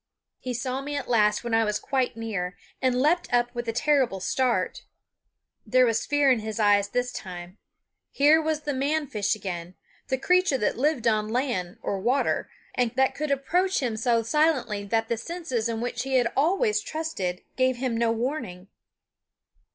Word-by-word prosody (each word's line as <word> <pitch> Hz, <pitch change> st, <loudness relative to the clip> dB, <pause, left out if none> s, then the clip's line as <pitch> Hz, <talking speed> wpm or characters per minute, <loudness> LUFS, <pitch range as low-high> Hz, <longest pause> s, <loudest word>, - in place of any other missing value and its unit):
He 250 Hz, -1 st, -4 dB
saw 255 Hz, +2 st, -2 dB
me 290 Hz, +1 st, -5 dB
at 285 Hz, -, -3 dB
last 210 Hz, -3 st, +2 dB
when 235 Hz, -1 st, -3 dB
I 225 Hz, 0 st, +4 dB
was 210 Hz, -1 st, 0 dB
quite 260 Hz, -2 st, -1 dB
near, 200 Hz, -5 st, -4 dB, 0.2 s
and 255 Hz, -1 st, +2 dB
leaped 325 Hz, +6 st, +2 dB
up 240 Hz, 0 st, +2 dB
with 240 Hz, -1 st, -4 dB
a -, -, +1 dB
terrible 255 Hz, -5 st, +1 dB
start. 250 Hz, +6 st, 0 dB, 0.8 s
There 255 Hz, 0 st, +4 dB
was 230 Hz, -2 st, 0 dB
fear 290 Hz, -2 st, +4 dB
in 250 Hz, -, +3 dB
his 220 Hz, 0 st, -5 dB
eyes 205 Hz, -1 st, +4 dB
this 245 Hz, +2 st, -1 dB
time. 180 Hz, -3 st, -8 dB, 0.5 s
Here 300 Hz, +3 st, +4 dB
was 310 Hz, -1 st, -1 dB
the 295 Hz, -1 st, -2 dB
man 290 Hz, +3 st, 0 dB
fish 210 Hz, -5 st, -1 dB
again, 180 Hz, -3 st, -6 dB, 0.3 s
the 265 Hz, -, 0 dB
creature 360 Hz, +1 st, +3 dB
that 210 Hz, -, 0 dB
lived 275 Hz, -2 st, 0 dB
on 215 Hz, -2 st, +2 dB
land 225 Hz, -7 st, -2 dB
or 195 Hz, -, -2 dB
water, 245 Hz, +8 st, 0 dB, 0.2 s
and 250 Hz, -2 st, +1 dB
that 265 Hz, 0 st, +3 dB
could 305 Hz, 0 st, -3 dB
approach 355 Hz, +8 st, +1 dB
him 245 Hz, -5 st, -1 dB
so 230 Hz, +1 st, +1 dB
silently 260 Hz, -6 st, +1 dB
that 225 Hz, +2 st, 0 dB
the 235 Hz, -, -1 dB
senses 255 Hz, -5 st, -3 dB
in 225 Hz, 0 st, -3 dB
which 245 Hz, -1 st, -2 dB
he 265 Hz, +1 st, -2 dB
had 245 Hz, -2 st, +2 dB
always 395 Hz, -, +2 dB
trusted 310 Hz, -, -4 dB
gave 255 Hz, 0 st, +2 dB
him 245 Hz, -1 st, -2 dB
no 230 Hz, 0 st, +2 dB
warning. 225 Hz, -7 st, -4 dB
245 Hz, 180 wpm, -26 LUFS, 220-280 Hz, 0.8 s, I